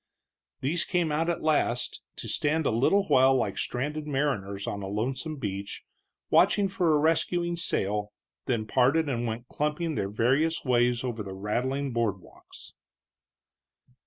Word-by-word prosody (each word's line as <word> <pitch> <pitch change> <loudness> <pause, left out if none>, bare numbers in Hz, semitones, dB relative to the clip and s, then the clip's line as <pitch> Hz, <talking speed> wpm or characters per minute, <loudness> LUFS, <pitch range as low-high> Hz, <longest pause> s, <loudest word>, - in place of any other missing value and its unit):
These 160 +6 +2
came 175 -4 0
out 160 +3 0
at 170 - -2
last, 135 -6 0
to - - -6
stand 155 +1 0
a - - +2
little 140 - +3
while 135 -5 +4
like 130 - 0
stranded 150 +4 -3
mariners 105 -9 -1
on 100 - -4
a 95 - -5
lonesome 130 +10 -3
beach 100 -6 -5 0.5
watching 200 -1 +4
for 180 -5 +2
a - - +4
rescuing 170 +3 +1
sail, 105 - -1 0.4
then 115 -5 0
parted 135 +7 +2
and 120 -3 -1
went 115 +2 -5
clumping 150 +4 -2
their 100 -8 -2
various 135 +11 +1
ways 120 -1 +2
over 120 -3 -3
the 95 -2 -6
rattling 130 +7 -2
board 115 -5 0
walks. - - -15
130 Hz, 150 wpm, -27 LUFS, 110-155 Hz, 0.5 s, while